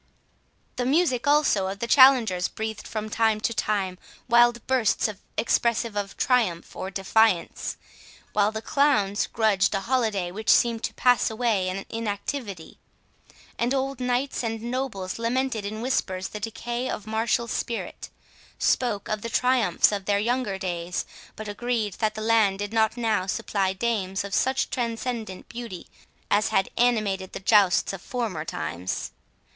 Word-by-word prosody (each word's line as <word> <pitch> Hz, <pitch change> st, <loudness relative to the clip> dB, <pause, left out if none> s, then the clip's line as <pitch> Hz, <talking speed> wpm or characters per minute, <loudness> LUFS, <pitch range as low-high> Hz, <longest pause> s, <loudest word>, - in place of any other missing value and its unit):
The 245 Hz, -, -1 dB
music 280 Hz, -4 st, +2 dB
also 285 Hz, -10 st, +3 dB
of 195 Hz, +1 st, -4 dB
the 235 Hz, -, -3 dB
challengers 235 Hz, -8 st, +5 dB
breathed 220 Hz, -1 st, -5 dB
from 215 Hz, -1 st, -4 dB
time 220 Hz, 0 st, +1 dB
to 230 Hz, -, 0 dB
time 195 Hz, -4 st, -1 dB, 0.3 s
wild 240 Hz, -1 st, +4 dB
bursts 255 Hz, -5 st, +2 dB, 0.3 s
expressive 235 Hz, -1 st, +1 dB
of 200 Hz, -1 st, -3 dB
triumph 220 Hz, -10 st, +1 dB
or 190 Hz, -, -4 dB
defiance, 195 Hz, 0 st, +1 dB, 0.6 s
while 205 Hz, 0 st, +3 dB
the 220 Hz, 0 st, -5 dB
clowns 225 Hz, -9 st, +2 dB
grudged 210 Hz, -3 st, +2 dB
a 195 Hz, -, 0 dB
holiday 215 Hz, -6 st, 0 dB
which 220 Hz, +4 st, -4 dB
seemed 235 Hz, -1 st, +4 dB
to -, -, -5 dB
pass 245 Hz, -1 st, +3 dB
away 220 Hz, -5 st, 0 dB
in 195 Hz, +1 st, -4 dB
inactivity; 205 Hz, -, -5 dB, 0.8 s
and 245 Hz, +3 st, +1 dB
old 270 Hz, 0 st, -2 dB
knights 250 Hz, +2 st, -1 dB
and 225 Hz, -1 st, -3 dB
nobles 235 Hz, -6 st, -3 dB
lamented 235 Hz, -2 st, -1 dB
in 215 Hz, +2 st, -5 dB
whispers 190 Hz, -7 st, -1 dB
the 210 Hz, -, -6 dB
decay 240 Hz, +3 st, -4 dB
of 215 Hz, -, -4 dB
martial 225 Hz, +2 st, 0 dB
spirit, 230 Hz, 0 st, -4 dB, 0.5 s
spoke 235 Hz, -6 st, +1 dB
of 215 Hz, -1 st, -2 dB
the 230 Hz, -, -4 dB
triumphs 250 Hz, -9 st, +3 dB
of 200 Hz, -2 st, -3 dB
their 205 Hz, 0 st, +2 dB
younger 225 Hz, -2 st, 0 dB
days, 175 Hz, -2 st, -3 dB, 0.3 s
but 215 Hz, -, -7 dB
agreed 220 Hz, -1 st, -2 dB
that 215 Hz, -1 st, 0 dB
the 215 Hz, -, -5 dB
land 215 Hz, -3 st, +3 dB
did 205 Hz, +2 st, -4 dB
not 220 Hz, +1 st, +2 dB
now 220 Hz, -5 st, 0 dB
supply 195 Hz, -2 st, 0 dB
dames 195 Hz, -2 st, -1 dB
of 200 Hz, -1 st, -7 dB
such 265 Hz, +1 st, +1 dB
transcendent 230 Hz, -4 st, -3 dB
beauty 235 Hz, -6 st, -7 dB, 0.5 s
as 210 Hz, +1 st, +3 dB
had 195 Hz, -, +1 dB
animated 210 Hz, -6 st, +1 dB
the -, -, -5 dB
jousts 195 Hz, -2 st, +4 dB
of 195 Hz, -, -7 dB
former 220 Hz, -11 st, -3 dB
times. 85 Hz, -, -4 dB
220 Hz, 150 wpm, -25 LUFS, 195-240 Hz, 0.8 s, challengers